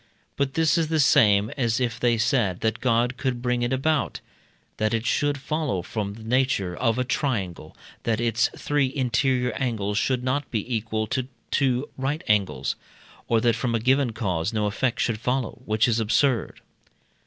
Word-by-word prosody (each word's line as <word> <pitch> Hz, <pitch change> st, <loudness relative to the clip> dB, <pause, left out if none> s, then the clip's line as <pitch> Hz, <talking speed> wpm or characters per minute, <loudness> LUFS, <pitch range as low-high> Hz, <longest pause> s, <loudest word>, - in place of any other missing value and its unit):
But 140 Hz, -1 st, -1 dB
this 160 Hz, 0 st, +3 dB
is 160 Hz, -, +1 dB
the 160 Hz, 0 st, 0 dB
same 105 Hz, -6 st, +4 dB
as 120 Hz, -3 st, +1 dB
if 120 Hz, -3 st, -1 dB
they 120 Hz, -1 st, +2 dB
said, 110 Hz, -5 st, +1 dB
that 110 Hz, 0 st, 0 dB
God 120 Hz, 0 st, +1 dB
could 130 Hz, -3 st, -1 dB
bring 125 Hz, 0 st, 0 dB
it 120 Hz, +1 st, 0 dB
about, 145 Hz, +3 st, 0 dB, 0.6 s
that 110 Hz, +1 st, +1 dB
it 115 Hz, +1 st, -2 dB
should 145 Hz, +2 st, +1 dB
follow 140 Hz, -, -2 dB
from 100 Hz, 0 st, -4 dB
the 110 Hz, -, -11 dB
nature 115 Hz, -6 st, +1 dB
of 115 Hz, +1 st, +1 dB
a 125 Hz, -, +1 dB
triangle 100 Hz, -, -3 dB, 0.2 s
that 110 Hz, -2 st, 0 dB
its 120 Hz, 0 st, +2 dB
three 145 Hz, -3 st, 0 dB
interior 125 Hz, -1 st, +1 dB
angles 105 Hz, -5 st, -1 dB
should 125 Hz, +3 st, 0 dB
not 130 Hz, +2 st, -1 dB
be 115 Hz, +2 st, -2 dB
equal 110 Hz, 0 st, -2 dB
to 125 Hz, +4 st, -2 dB, 0.2 s
two 130 Hz, -1 st, +1 dB
right 145 Hz, +4 st, -2 dB
angles; 105 Hz, -2 st, +1 dB, 0.5 s
or 115 Hz, -, +3 dB
that 115 Hz, -1 st, +3 dB
from 115 Hz, 0 st, -1 dB
a -, -, +1 dB
given 130 Hz, +2 st, +2 dB
cause 95 Hz, -5 st, -2 dB
no 110 Hz, -2 st, 0 dB
effect 120 Hz, +4 st, -1 dB
should 110 Hz, -3 st, 0 dB
follow, 125 Hz, -1 st, -2 dB
which 110 Hz, +2 st, +2 dB
is 115 Hz, -1 st, +1 dB
absurd. 115 Hz, +3 st, +1 dB
120 Hz, 175 wpm, -25 LUFS, 110-130 Hz, 0.6 s, same